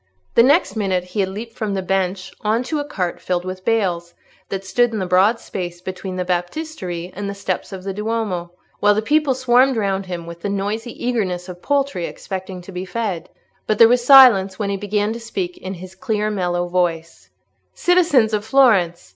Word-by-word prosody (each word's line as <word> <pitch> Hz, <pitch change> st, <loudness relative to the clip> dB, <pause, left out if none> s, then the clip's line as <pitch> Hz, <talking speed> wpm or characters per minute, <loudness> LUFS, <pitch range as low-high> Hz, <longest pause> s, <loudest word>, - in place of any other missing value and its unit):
The -, -, +6 dB
next 285 Hz, +6 st, +3 dB
minute 190 Hz, -4 st, 0 dB
he 180 Hz, +3 st, -6 dB
had 190 Hz, -1 st, +1 dB
leaped 225 Hz, +4 st, -7 dB
from 215 Hz, -4 st, -3 dB
the 190 Hz, -, -2 dB
bench 190 Hz, 0 st, -1 dB
on 220 Hz, +3 st, +1 dB
to 305 Hz, +4 st, -2 dB
a -, -, -1 dB
cart 185 Hz, -12 st, -3 dB
filled 180 Hz, -1 st, -2 dB
with 185 Hz, 0 st, -6 dB
bales, 180 Hz, -7 st, 0 dB, 0.3 s
that 195 Hz, 0 st, -4 dB
stood 240 Hz, +6 st, +2 dB
in 220 Hz, -, -3 dB
the 190 Hz, -, -1 dB
broad 190 Hz, +6 st, +3 dB
space 175 Hz, -2 st, -6 dB
between 185 Hz, +1 st, -6 dB
the 180 Hz, 0 st, -2 dB
Baptistery 180 Hz, -, -4 dB
and 200 Hz, +1 st, -4 dB
the 200 Hz, -, -5 dB
steps 190 Hz, -2 st, -3 dB
of 190 Hz, -1 st, -7 dB
the 195 Hz, 0 st, -4 dB
Duomo, 210 Hz, -5 st, -3 dB, 0.3 s
while 205 Hz, 0 st, +4 dB
the 215 Hz, -, 0 dB
people 295 Hz, +1 st, +2 dB
swarmed 255 Hz, 0 st, +3 dB
round 195 Hz, -2 st, -1 dB
him 175 Hz, -2 st, -5 dB
with 170 Hz, 0 st, -10 dB
the 200 Hz, -, -2 dB
noisy 205 Hz, +4 st, -3 dB
eagerness 185 Hz, -7 st, -1 dB
of 180 Hz, -1 st, -9 dB
poultry 280 Hz, -10 st, 0 dB
expecting 185 Hz, -1 st, -7 dB
to 195 Hz, -, -11 dB
be 180 Hz, 0 st, -5 dB
fed. 195 Hz, -3 st, -3 dB, 0.4 s
But 215 Hz, -, +1 dB
there 230 Hz, -, +8 dB
was 245 Hz, +1 st, +2 dB
silence 240 Hz, -8 st, +7 dB
when 200 Hz, -2 st, -2 dB
he -, -, 0 dB
began 205 Hz, +2 st, -1 dB
to 230 Hz, -, -6 dB
speak 195 Hz, -6 st, -4 dB
in 190 Hz, +1 st, -6 dB
his 185 Hz, +1 st, -10 dB
clear 210 Hz, +2 st, -2 dB
mellow 175 Hz, -3 st, -1 dB
voice— 170 Hz, -2 st, -2 dB, 0.5 s
"Citizens 325 Hz, -11 st, +3 dB
of 210 Hz, -1 st, 0 dB
Florence! 210 Hz, -, +3 dB
195 Hz, 200 wpm, -20 LUFS, 180-230 Hz, 0.5 s, there